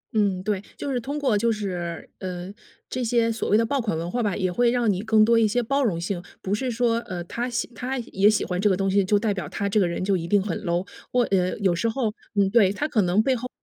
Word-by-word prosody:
嗯， 200 -4 +1
对， 200 -1 -1 0.2
就 285 - -3
是 250 - 0
通 280 +5 -4
过 270 -7 +1
就 230 +3 +2
是 180 -5 -4
呃， 180 0 -6 0.3
这 255 - -3
些 230 0 +2
所 225 - -3
谓 210 - +5
的 230 - +3
爆 275 +4 0
款 210 -8 -1
文 165 +2 -3
化 245 - -1
吧， 205 -5 0
也 185 -2 0
会 240 +6 +3
让 240 -2 +2
你 185 - -3
更 220 0 +4
多 230 +1 +4
一 225 - +4
些 245 +4 +1
包 275 +4 +1
容 190 -9 0
性， 175 +1 -3 0.2
不 195 - -2
是 255 +5 -1
说， 235 -1 +1
呃， 180 -6 -6
他 240 +8 -4
喜 235 - -2
他 255 +3 -3
也 210 -4 +2
喜 215 - +1
欢 180 +1 -2
这 210 - +4
个 190 - +2
东 195 0 0
西， 200 +1 +3
就 205 +2 +3
代 210 0 0
表 190 - -5
他 200 - -2
这 200 +2 +2
个 190 - +3
人 170 +1 -3
就 195 +1 +2
一 170 -2 -3
定 205 +3 +4
很 190 -4 -2
low。 175 +3 -1 0.2
我 250 -1 +3
呃， 185 -1 +1
有 195 -4 +2
时 230 +7 0
候 225 -2 -1 0.2
嗯， 200 -1 +4
对， 205 -4 +5
它 290 +9 -2
可 225 -8 +2
能 185 +3 +2
背 265 +1 +2
后 250 +1 -5
210 Hz, 310 characters per minute, -24 LUFS, 185-235 Hz, 0.3 s, 谓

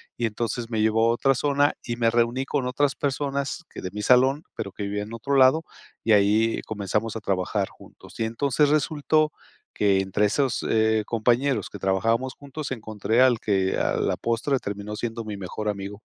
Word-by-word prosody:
Y 120 -1 0
entonces 115 +2 -3
me 110 -2 -1
llevó 110 +1 +3
a - - +3
otra 135 +3 +2
zona, 145 +2 +2
y 120 - -3
me 115 -1 +2
reuní 120 +3 +1
con 135 -3 -1
otras 135 +2 +1
personas, 140 +2 -2
que - - -9
de 90 - -4
mi 105 0 -5
salón, 130 +6 +4
pero 100 -3 -5
que 100 - -6
vivía 100 +1 -2
en 110 - -10
otro 135 +5 -2
lado, 135 +5 +5 0.4
y 110 - +1
ahí 105 +2 +3
comenzamos 105 +1 -2
a - - -3
trabajar 95 0 -1
juntos. - - -16
Y 110 - +1
entonces 140 +5 +1
resultó, 155 +1 +2 0.4
que 100 -2 +2
entre 95 +2 +1
esos, 135 +4 0
eh, 110 -1 +2
compañeros 120 +4 +1
que 105 - -9
trabajábamos 115 +7 0
juntos, 145 +1 -7
encontré 110 0 0
al 125 -3 +5
que 95 -2 0
a - - +1
la - - 0
postre, 120 +4 0
terminó 100 +1 -5
siendo 115 +1 -4
mi 105 -1 -5
mejor 100 +3 -5
amigo. 100 +1 -5
115 Hz, 190 wpm, -25 LUFS, 105-135 Hz, 0.4 s, lado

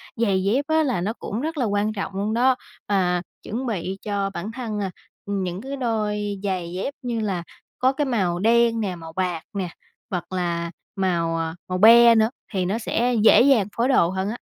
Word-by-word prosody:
giày 200 -5 +1
dép 240 +9 +1
á, 315 0 +3
là 255 - 0
nó 205 +5 -1
cũng 225 -1 -5
rất 315 +2 -3
là 255 - +1
quan 205 0 0
trọng 200 -1 -4
luôn 205 +3 -1
đó, 255 +3 +4 0.3
à, 180 -3 +1 0.2
chuẩn 245 +5 -4
bị 195 -5 -3
cho 200 -2 -1
bản 190 +5 -5
thân, 225 -3 -4
à, 195 -2 -2 0.3
ừm, 200 -1 -2
những 180 +1 -4
cái 270 +3 -5
đôi 210 -4 -1
giày 180 -3 -2
dép 190 +10 -3
như 240 -3 -2
là 195 -5 -2 0.4
có 260 +1 +3
cái 290 +2 0
màu 190 -9 0
đen 230 +2 +3
nè, 190 -4 -2
màu 165 -1 -10
bạc 180 -2 -2
nè, 190 -3 -2 0.4
hoặc 180 -4 -4
là 170 -2 -1 0.2
màu, 170 -4 0
à, 165 0 -3
màu 185 0 -2
be 235 +3 +8
nữa 220 0 +4 0.2
thì 185 -2 0
nó 200 +5 0
sẽ 240 +2 0
dễ 225 - +7
dàng 250 -7 +4
phối 235 - +2
đồ 260 -11 +4
hơn 190 +2 -2
á. 230 - -4
205 Hz, 210 wpm, -23 LUFS, 185-235 Hz, 0.4 s, be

